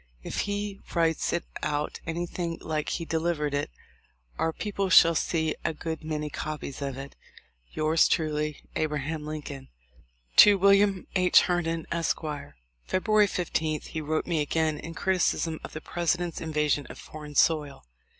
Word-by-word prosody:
If -, -, -4 dB
he 205 Hz, -1 st, -3 dB, 0.2 s
writes 165 Hz, -1 st, +2 dB
it 175 Hz, -, -1 dB, 0.2 s
out 150 Hz, 0 st, -2 dB
anything 170 Hz, 0 st, -3 dB
like 155 Hz, -1 st, -2 dB
he 165 Hz, -, -2 dB
delivered 160 Hz, -3 st, -1 dB
it 145 Hz, -, -1 dB, 0.7 s
our 165 Hz, -, +1 dB
peo 210 Hz, +6 st, -5 dB
ple 195 Hz, -1 st, -1 dB
shall 170 Hz, -2 st, +8 dB
see 160 Hz, -1 st, 0 dB
a 160 Hz, -, -1 dB
good 160 Hz, +1 st, -5 dB
many 155 Hz, -1 st, -3 dB
copies 150 Hz, -2 st, -5 dB
of 135 Hz, -2 st, -3 dB
it. 135 Hz, +1 st, -8 dB, 0.6 s
"Yours 155 Hz, +1 st, +3 dB
truly, 150 Hz, -2 st, -1 dB
"A. 155 Hz, -, +1 dB
Lincoln." 150 Hz, -1 st, -5 dB, 0.7 s
To 205 Hz, -1 st, +9 dB
Wm, 200 Hz, 0 st, +4 dB
H. 180 Hz, -1 st, +6 dB
Herndon, 165 Hz, -2 st, -1 dB
Esq. 170 Hz, -1 st, 0 dB, 0.7 s
February 210 Hz, +2 st, +3 dB
15 160 Hz, -4 st, -1 dB
he 160 Hz, -, -5 dB
wrote 155 Hz, +1 st, -1 dB
me 165 Hz, -3 st, 0 dB
again 155 Hz, 0 st, 0 dB
in 165 Hz, +1 st, -8 dB
criticism 180 Hz, -3 st, +1 dB
of -, -, -8 dB
the 155 Hz, -, -6 dB
President's 175 Hz, +1 st, -1 dB
invasion 150 Hz, -2 st, 0 dB
of -, -, -10 dB
foreign 150 Hz, -1 st, -10 dB
soil. 150 Hz, -, +2 dB
160 Hz, 150 wpm, -27 LUFS, 150-175 Hz, 0.7 s, To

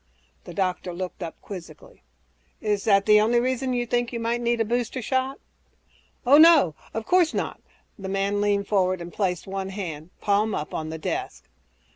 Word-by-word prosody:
The -, -, -9 dB
doctor 185 Hz, -2 st, -1 dB
looked 185 Hz, +1 st, -6 dB
up 170 Hz, -2 st, -6 dB
quizzically, 205 Hz, -, -10 dB, 0.6 s
"Is 210 Hz, -2 st, -1 dB
that 200 Hz, -2 st, +4 dB
the 210 Hz, -1 st, +6 dB
only 235 Hz, +3 st, +3 dB
reason 255 Hz, +1 st, -1 dB
you 245 Hz, -1 st, 0 dB
think 240 Hz, 0 st, 0 dB
you 235 Hz, -, -3 dB
might 230 Hz, +1 st, -1 dB
need 235 Hz, 0 st, +1 dB
a 225 Hz, -, +2 dB
booster 240 Hz, +2 st, -1 dB
shot?" 260 Hz, +3 st, -1 dB, 0.9 s
"Oh, 280 Hz, +4 st, +7 dB
no... 315 Hz, -, +7 dB, 0.2 s
of 225 Hz, 0 st, -4 dB
course 355 Hz, 0 st, +3 dB
not!" -, -, -3 dB, 0.4 s
The 190 Hz, -1 st, -5 dB
man 195 Hz, +1 st, 0 dB
leaned 205 Hz, -1 st, +1 dB
forward 185 Hz, -3 st, +1 dB
and 170 Hz, 0 st, -8 dB
placed 180 Hz, -4 st, -1 dB
one 195 Hz, 0 st, -4 dB
hand, 170 Hz, -5 st, -6 dB
palm 205 Hz, +1 st, +1 dB
up, 150 Hz, -, -5 dB
on 155 Hz, 0 st, -3 dB
the 160 Hz, -, -5 dB
desk. 155 Hz, -, -4 dB
205 Hz, 180 wpm, -25 LUFS, 190-240 Hz, 0.9 s, Oh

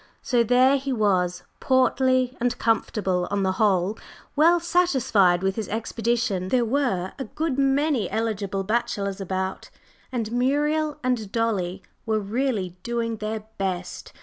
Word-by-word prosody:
So 240 Hz, -3 st, +2 dB
here 255 Hz, +4 st, +4 dB
he 275 Hz, 0 st, -4 dB
was, 185 Hz, -6 st, +1 dB, 0.2 s
portly 260 Hz, 0 st, +2 dB
and 245 Hz, 0 st, 0 dB
comfortable, 200 Hz, -5 st, 0 dB
and 200 Hz, -, -7 dB
on 200 Hz, -1 st, +1 dB
the 190 Hz, -, +2 dB
whole 195 Hz, 0 st, +1 dB, 0.4 s
well 335 Hz, +4 st, +5 dB
satisfied 265 Hz, -, +2 dB
with 195 Hz, +1 st, 0 dB
his 215 Hz, -4 st, -3 dB
expedition; 225 Hz, -3 st, -1 dB
there 245 Hz, +3 st, +2 dB
were 230 Hz, -8 st, 0 dB
a 270 Hz, -, -3 dB
good 285 Hz, +3 st, -2 dB
many 275 Hz, -, +2 dB
eligible 200 Hz, -3 st, -2 dB
bachelors 200 Hz, -2 st, -1 dB
about, 190 Hz, 0 st, -3 dB, 0.4 s
and 230 Hz, -4 st, -3 dB
Muriel 295 Hz, +5 st, +1 dB
and 240 Hz, -6 st, -1 dB
Dolly 205 Hz, -6 st, -1 dB, 0.2 s
were 220 Hz, -1 st, +1 dB
really 205 Hz, -4 st, -2 dB
doing 230 Hz, 0 st, -2 dB
their 215 Hz, +1 st, -3 dB, 0.2 s
best. 185 Hz, -2 st, -4 dB
225 Hz, 140 wpm, -24 LUFS, 195-260 Hz, 0.4 s, well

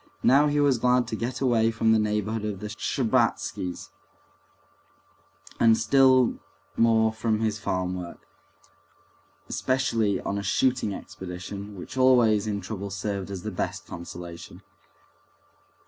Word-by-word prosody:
Now 140 Hz, +3 st, +5 dB
he 145 Hz, 0 st, +1 dB
was 140 Hz, -4 st, +3 dB
glad 125 Hz, +1 st, +2 dB
to -, -, -2 dB
get 120 Hz, +3 st, -4 dB
away 115 Hz, -4 st, +3 dB
from 115 Hz, 0 st, +1 dB
the 110 Hz, -, +4 dB
neighborhood 105 Hz, +1 st, -1 dB
of 105 Hz, -3 st, -3 dB
the 105 Hz, -, -6 dB
Shtcherbatskys, 105 Hz, -5 st, -1 dB, 1.7 s
and 115 Hz, -1 st, +5 dB
still 130 Hz, -2 st, +4 dB, 0.4 s
more 110 Hz, -1 st, +3 dB
from 110 Hz, -1 st, -1 dB
his 110 Hz, -1 st, -1 dB
farm 95 Hz, -3 st, -2 dB
work, 90 Hz, -1 st, -9 dB, 1.2 s
especially 115 Hz, -6 st, 0 dB
on 100 Hz, -, -3 dB
a -, -, -3 dB
shooting 120 Hz, +2 st, +1 dB
expedition, 95 Hz, +2 st, -8 dB
which 95 Hz, +7 st, -9 dB
always 120 Hz, -5 st, +4 dB
in 100 Hz, -1 st, -2 dB
trouble 100 Hz, +1 st, -6 dB
served 100 Hz, 0 st, -4 dB
as 95 Hz, -3 st, -6 dB
the 110 Hz, -, -4 dB
best 90 Hz, -, -4 dB
consolation. 85 Hz, 0 st, -9 dB
110 Hz, 130 wpm, -26 LUFS, 100-120 Hz, 1.7 s, Now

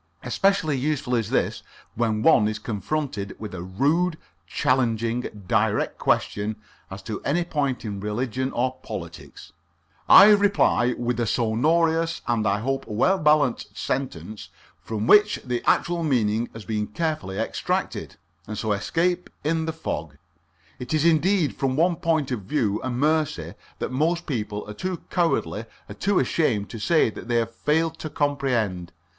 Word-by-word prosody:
Especially 165 Hz, +3 st, +1 dB
useful 135 Hz, -1 st, -1 dB
is 115 Hz, -4 st, 0 dB
this -, -, 0 dB, 0.3 s
when 110 Hz, -2 st, 0 dB
one 105 Hz, -10 st, +5 dB
is 110 Hz, 0 st, -2 dB
confronted 105 Hz, -2 st, -3 dB
with 110 Hz, -3 st, -7 dB
a 90 Hz, -, -5 dB
rude, 150 Hz, -, +1 dB, 0.3 s
challenging, 115 Hz, -3 st, 0 dB
direct -, -, +1 dB
question 105 Hz, +1 st, 0 dB, 0.3 s
as 95 Hz, 0 st, -8 dB
to 110 Hz, +1 st, -5 dB
any 175 Hz, +5 st, 0 dB
point 140 Hz, -7 st, -2 dB
in 100 Hz, -2 st, -4 dB
religion 125 Hz, +5 st, -2 dB
or 130 Hz, +1 st, -1 dB
politics; 80 Hz, -5 st, -9 dB, 0.6 s
I 210 Hz, -, +10 dB
reply 200 Hz, -11 st, +3 dB
with 120 Hz, 0 st, -2 dB
a 120 Hz, -, 0 dB
sonorous 160 Hz, +9 st, +1 dB
and, 115 Hz, -2 st, +1 dB
I 100 Hz, +1 st, +1 dB
hope, 135 Hz, +3 st, -2 dB
well 185 Hz, -, +2 dB
balanced 150 Hz, -5 st, +2 dB
sentence, 110 Hz, -6 st, -4 dB, 0.3 s
from 110 Hz, -1 st, -3 dB
which 210 Hz, -, +5 dB
the 125 Hz, -1 st, -2 dB
actual 170 Hz, 0 st, +1 dB
meaning 115 Hz, -5 st, +1 dB
has 115 Hz, -3 st, -10 dB
been 105 Hz, +1 st, -2 dB
carefully 155 Hz, -, -3 dB
extracted, 110 Hz, -, -2 dB, 0.3 s
and 110 Hz, 0 st, -5 dB
so 110 Hz, 0 st, -1 dB
escape 175 Hz, -, 0 dB
in 160 Hz, +1 st, 0 dB
the 160 Hz, -, -1 dB
fog. 75 Hz, -, -5 dB, 0.6 s
It 125 Hz, +5 st, -2 dB
is 155 Hz, +1 st, +1 dB
indeed 170 Hz, 0 st, +3 dB
from 135 Hz, -1 st, -1 dB
one 170 Hz, +3 st, +2 dB
point 155 Hz, -5 st, 0 dB
of 120 Hz, -4 st, -2 dB
view 105 Hz, -1 st, -1 dB
a 130 Hz, -, -2 dB
mercy 145 Hz, -, 0 dB, 0.2 s
that -, -, -4 dB
most 165 Hz, +6 st, 0 dB
people 105 Hz, -6 st, -4 dB
are 105 Hz, -, -6 dB
too 180 Hz, -, -4 dB
cowardly 165 Hz, -, 0 dB, 0.2 s
or -, -, -8 dB
too 200 Hz, -1 st, 0 dB
ashamed 110 Hz, -11 st, +1 dB
to 115 Hz, -, -7 dB
say 155 Hz, 0 st, +3 dB
that 115 Hz, -, -10 dB
they 120 Hz, -, 0 dB
have 115 Hz, 0 st, 0 dB
failed 160 Hz, +6 st, 0 dB
to 155 Hz, -, -5 dB
comprehend. 125 Hz, -, -1 dB
125 Hz, 155 wpm, -24 LUFS, 110-160 Hz, 0.6 s, I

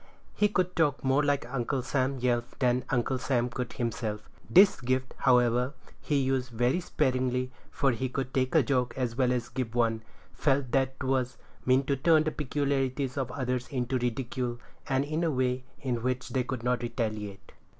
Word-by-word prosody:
He 210 Hz, -, +3 dB
could 185 Hz, -3 st, 0 dB
talk 150 Hz, -4 st, +1 dB
more 135 Hz, +2 st, +3 dB
like 145 Hz, -2 st, +1 dB
Uncle 125 Hz, +1 st, -2 dB
Sam 135 Hz, +1 st, 0 dB
Yelf 120 Hz, -1 st, -1 dB
than 125 Hz, -1 st, +1 dB
Uncle 130 Hz, 0 st, 0 dB
Sam 125 Hz, -2 st, 0 dB
could 125 Hz, 0 st, -4 dB
himself. 110 Hz, -3 st, -3 dB, 0.2 s
This 190 Hz, -2 st, +6 dB
gift, 130 Hz, +1 st, -1 dB
however, 125 Hz, +1 st, +3 dB, 0.3 s
he 150 Hz, -, -1 dB
used 130 Hz, -2 st, +1 dB
very 120 Hz, +7 st, +1 dB
sparingly, 130 Hz, -5 st, 0 dB, 0.2 s
for 140 Hz, -2 st, +1 dB
he 125 Hz, +2 st, -2 dB
could 130 Hz, 0 st, -3 dB
take 130 Hz, +3 st, 0 dB
a 160 Hz, -, +6 dB
joke 125 Hz, -1 st, 0 dB
as 125 Hz, -3 st, -1 dB
well 125 Hz, -1 st, +2 dB
as 125 Hz, -2 st, -1 dB
give 120 Hz, -2 st, -4 dB
one; 115 Hz, -2 st, +2 dB, 0.3 s
felt 135 Hz, -3 st, +1 dB
that 135 Hz, 0 st, +1 dB
'twas 130 Hz, -2 st, 0 dB, 0.3 s
mean 130 Hz, +1 st, +4 dB
to 140 Hz, 0 st, 0 dB
turn 155 Hz, +3 st, +4 dB
the 155 Hz, -, -1 dB
peculiarities 135 Hz, -2 st, -1 dB
of 135 Hz, -3 st, -2 dB
others 125 Hz, -2 st, -2 dB
into 130 Hz, -1 st, -1 dB
ridicule, 120 Hz, 0 st, -2 dB, 0.3 s
and 135 Hz, +1 st, +2 dB
in 155 Hz, +3 st, -1 dB
a 165 Hz, -, +2 dB
way 130 Hz, -2 st, 0 dB, 0.2 s
in 125 Hz, -3 st, -1 dB
which 125 Hz, +1 st, -2 dB
they 130 Hz, -2 st, 0 dB
could 125 Hz, -2 st, -4 dB
not 125 Hz, 0 st, +1 dB
retaliate. 110 Hz, -4 st, -4 dB
130 Hz, 180 wpm, -29 LUFS, 120-135 Hz, 0.3 s, This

